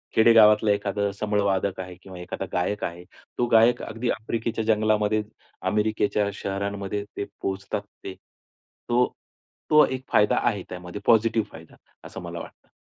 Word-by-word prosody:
खेडेगावातला 110 Hz, -2 st, +6 dB
एखादा 100 Hz, 0 st, 0 dB
संबळ 105 Hz, +1 st, -1 dB
वादक 95 Hz, -1 st, 0 dB
आहे 90 Hz, -1 st, -6 dB
किंवा 95 Hz, -1 st, -11 dB
एखादा 90 Hz, -, -5 dB
गायक 90 Hz, +4 st, -1 dB
आहे, 85 Hz, +1 st, -4 dB, 0.3 s
तो 120 Hz, -, +2 dB
गायक 115 Hz, +1 st, +5 dB
अगदी 115 Hz, +2 st, -3 dB
आफ्रिकेच्या 115 Hz, +1 st, -2 dB
जंगलामध्ये 110 Hz, -1 st, +2 dB, 0.5 s
अमेरिकेच्या 105 Hz, -1 st, +1 dB
शहरांमध्ये 100 Hz, +1 st, -3 dB
ते 100 Hz, -, -2 dB, 0.2 s
पोहचतात 95 Hz, +1 st, -3 dB, 0.2 s
ते. 95 Hz, -, -6 dB, 0.8 s
तो 125 Hz, +1 st, +2 dB, 0.6 s
तो 150 Hz, 0 st, +7 dB
एक 130 Hz, 0 st, -4 dB
फायदा 105 Hz, -, +4 dB
आहे 100 Hz, -, 0 dB
त्यामध्ये 90 Hz, +2 st, -7 dB
पॉझिटिव्ह 115 Hz, -1 st, +3 dB
फायदा 80 Hz, 0 st, -13 dB, 0.3 s
असं -, -, -8 dB
मला -, -, -6 dB
वाटतं. -, -, -12 dB
105 Hz, 140 wpm, -25 LUFS, 100-110 Hz, 0.8 s, तो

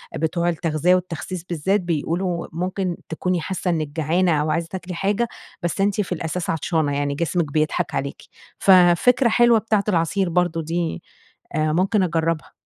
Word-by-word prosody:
بتوع 170 Hz, +2 st, 0 dB
التغذية 165 Hz, +1 st, +2 dB
والتخسيس 180 Hz, 0 st, -4 dB
بالذات 180 Hz, +4 st, 0 dB
بيقولوا 170 Hz, +1 st, -2 dB
ممكن 180 Hz, +1 st, -2 dB
تكوني 175 Hz, +2 st, -1 dB
حاسة 185 Hz, +2 st, -3 dB
إنك 155 Hz, -3 st, -1 dB
جعانة 165 Hz, +4 st, +1 dB
أو 155 Hz, +1 st, 0 dB
عايزة 165 Hz, +1 st, -1 dB
تاكلي 180 Hz, -1 st, -6 dB
حاجة، 205 Hz, +6 st, 0 dB, 0.4 s
بس 175 Hz, +3 st, -1 dB
أنتِ 200 Hz, +1 st, +2 dB
في 190 Hz, -, -6 dB
الأساس 165 Hz, +1 st, -3 dB
عطشانة، 160 Hz, -2 st, 0 dB
يعني 145 Hz, 0 st, -1 dB
جسمك 170 Hz, 0 st, -1 dB
بيضحك 155 Hz, +1 st, 0 dB
عليكِ. 135 Hz, +1 st, -1 dB, 0.5 s
ففكرة 190 Hz, +7 st, +5 dB
حلوة 240 Hz, 0 st, +5 dB
بتاعة 215 Hz, -2 st, +1 dB
العصير 175 Hz, +1 st, +1 dB
برضه 175 Hz, -1 st, +1 dB
دي 170 Hz, +1 st, -3 dB, 0.5 s
آآ، 155 Hz, 0 st, +1 dB
ممكن 190 Hz, +3 st, +2 dB
أجربها. 165 Hz, -3 st, -1 dB
175 Hz, 150 wpm, -22 LUFS, 160-185 Hz, 0.5 s, ففكرة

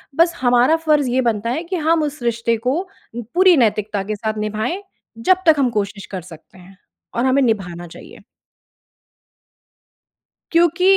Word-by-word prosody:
बस 335 Hz, +2 st, +3 dB
हमारा 245 Hz, +4 st, +4 dB
फ़र्ज़ 295 Hz, -4 st, +3 dB
ये 260 Hz, +1 st, +1 dB
बनता 230 Hz, -1 st, -1 dB
है 310 Hz, +7 st, -2 dB
कि 360 Hz, +2 st, -4 dB
हम 325 Hz, -1 st, +1 dB
उस 295 Hz, -2 st, -4 dB
रिश्ते 230 Hz, -1 st, 0 dB
को 285 Hz, +7 st, +1 dB, 0.5 s
पूरी 370 Hz, -1 st, +6 dB
नैतिकता 210 Hz, -3 st, +1 dB
के 210 Hz, +2 st, -4 dB
साथ 215 Hz, +1 st, -3 dB
निभाएँ, 215 Hz, -, -3 dB, 0.3 s
जब 365 Hz, +11 st, +3 dB
तक 320 Hz, -, +7 dB
हम 255 Hz, -3 st, +3 dB
कोशिश 205 Hz, -2 st, -3 dB
कर 185 Hz, -2 st, -4 dB
सकते 165 Hz, +1 st, -15 dB
हैं 185 Hz, +1 st, -16 dB, 0.4 s
और 235 Hz, -, 0 dB
हमें 265 Hz, +1 st, +3 dB
निभाना 180 Hz, -8 st, -1 dB
चाहिए। -, -, -14 dB, 2.3 s
क्योंकि 345 Hz, +3 st, +4 dB
240 Hz, 155 wpm, -19 LUFS, 210-315 Hz, 2.3 s, तक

